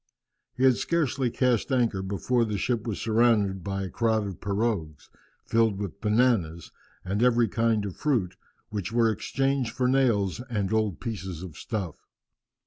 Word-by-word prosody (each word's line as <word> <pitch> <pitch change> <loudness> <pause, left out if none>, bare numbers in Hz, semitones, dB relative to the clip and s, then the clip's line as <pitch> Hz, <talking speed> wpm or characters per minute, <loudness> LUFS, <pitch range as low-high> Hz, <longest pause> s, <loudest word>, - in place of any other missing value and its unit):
He 130 - 0
had 130 -2 +5
scarcely 140 -6 0
cast 125 0 +1
anchor 120 -7 +1
before 100 +6 0
the 105 -2 -2
ship 120 +2 -1
was 110 - -3
surrounded 110 -4 +2
by 95 -1 -3
a 95 - -4
crowd 110 -2 +1
of 95 -3 -7
pirogues, 100 -7 -2 0.3
filled 115 -3 +2
with 100 -4 -6
bananas 105 -8 +1 0.3
and 100 +4 -1
every 120 -1 +4
kind 115 0 +1
of 95 - -5
fruit, 120 -12 0 0.4
which 105 -1 -3
were 115 -1 +3
exchanged 135 +2 -1
for 125 -1 +1
nails 115 -8 +2
and 105 -4 -1
old 110 -5 0
pieces 95 -7 -5
of 85 -5 -9
stuff. 100 -8 -4
110 Hz, 155 wpm, -27 LUFS, 95-120 Hz, 0.4 s, had